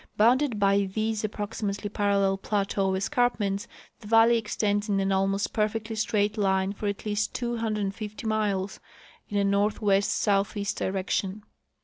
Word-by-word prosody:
Bounded 245 +2 +3
by 200 0 +3
these 220 +1 -1
ap 215 - 0
proximately 205 -1 -3
parallel 200 -1 +1
plateau 195 -1 0
escarpments, 205 -2 0 0.3
the 210 - -12
valley 225 +2 +6
extends 210 -1 -1
in 200 -1 +2
an 195 0 0
almost 195 +1 0
perfectly 220 +1 -1
straight 210 0 0
line 190 -1 +1
for 205 +1 -4
at 200 +1 -3
least 210 0 -1
250 215 -2 -3
miles 205 -3 -1 0.5
in 205 - -2
a 200 - +3
north 200 +1 +1
west 200 -2 +2
southeast 200 0 0
direction. 195 +1 -2
205 Hz, 140 wpm, -27 LUFS, 195-215 Hz, 0.5 s, valley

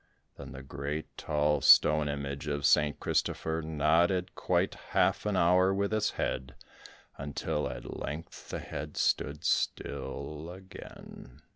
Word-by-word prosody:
Then - - -10
the 70 -1 -9
great 70 +3 -5
tall 75 -1 0
stone 75 +2 +6
image 70 0 -4
of 70 -1 -1
St. 75 -1 +3
Christopher 80 0 -1
nodded 85 +4 +2
quite - - 0
half - - 0
an 105 - 0
hour 90 +2 +4
with 100 +2 0
its 110 - +2
head, 65 0 -2 0.6
until 75 +1 -2
at 60 -1 -7
length 75 +4 -7
the - - -3
head - - -7
stood 75 +2 0
still 75 +3 -2
again. 90 -7 -12
75 Hz, 130 wpm, -30 LUFS, 70-85 Hz, 0.6 s, stone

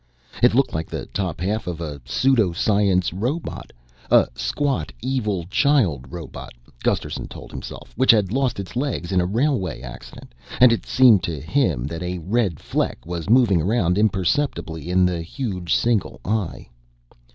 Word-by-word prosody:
It 125 -1 +5
looked 135 +1 +2
like 80 0 -3
the - - -5
top 95 -4 -3
half 105 +4 -2
of 85 -2 -4
a 75 -4 -6
pseudo 110 - +2
science 95 -2 +2
robot 125 - -4 0.4
a - - +6
squat 125 - -1
evil 110 -8 -1
child 100 - +2
robot, 85 -5 -8 0.3
Gusterson - - -1
told - - -11
himself, - - -9
which 130 - +1
had 105 -4 +5
lost 135 -5 0
its 100 +2 -7
legs 125 -9 -2
in 95 -1 +3
a 90 - 0
railway 100 - 0
accident 60 -1 -11 0.3
and 125 -1 +7
it 115 - -3
seemed 125 -7 +6
to 80 -5 -4
him 80 - 0
that 80 +4 -5
a 90 0 -3
red 95 -1 -1
fleck - - -2
was 85 +1 -5
moving 115 -8 +5
around 90 -1 +1
imperceptibly 95 - 0
in 90 0 +4
the 90 -2 -1
huge 90 - -2
single 115 -4 0
eye. 105 -3 -2
95 Hz, 160 wpm, -22 LUFS, 85-120 Hz, 0.4 s, and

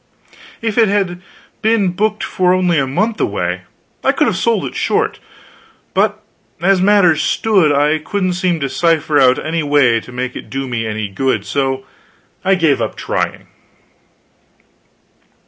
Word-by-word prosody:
If 225 -1 0
it 225 - +5
had 190 -3 -1 0.4
been 220 -4 +2
booked 210 +3 -1
for 180 0 +1
only 180 -3 +2
a 135 - 0
month 215 +11 -1
away, 90 -2 -2 0.4
I - - +4
could - - +1
have - - 0
sold - - 0
it - - -6
short; - - 0 0.7
but, - - 0 0.4
as 190 +2 +2
matters 185 -5 +4
stood, 195 -9 +2
I 145 +2 +2
couldn't 185 +3 -2
seem 180 -1 0
to 140 - 0
cipher 155 -1 +1
out 130 -1 +5
any 160 +1 -2
way 145 -6 +3
to 130 - -13
make 125 0 -4
it - - -8
do 135 0 -4
me 115 -3 -3
any 110 -1 -3
good, 130 +7 -1
so 135 -1 -1 0.6
I 195 +1 +3
gave 160 -6 +2
up - - -2
trying. - - -3
160 Hz, 155 wpm, -16 LUFS, 135-190 Hz, 0.7 s, it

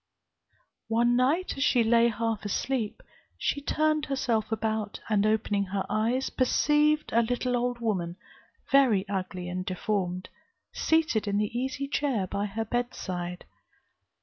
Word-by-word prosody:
"One 240 +2 +3
night, 285 +9 +1
as - - +2
she 245 -5 +4
lay 230 +1 +4
half 225 -2 -1
asleep, 220 +2 -2 0.3
she 285 - -1
turned 310 +1 +1
herself 245 -6 0
about, 220 -1 -2
and 210 -1 +3
opening 210 -2 +1
her 195 0 -2
eyes, 235 +5 0
perceived 300 +3 +2
a 235 - +5
little 245 +2 0
old 245 0 0
woman, 190 -7 -2 0.6
very 235 -8 +4
ugly 185 -2 -4
and 180 +1 -3
deformed, 185 -1 -2 0.4
seated 320 -10 +1
in 200 0 +1
the 210 +2 -1
easy 265 +2 -2
chair 275 -8 0
by 200 +3 -2
her 220 +3 -3
bedside. 185 -7 -3
225 Hz, 135 wpm, -28 LUFS, 200-255 Hz, 0.6 s, a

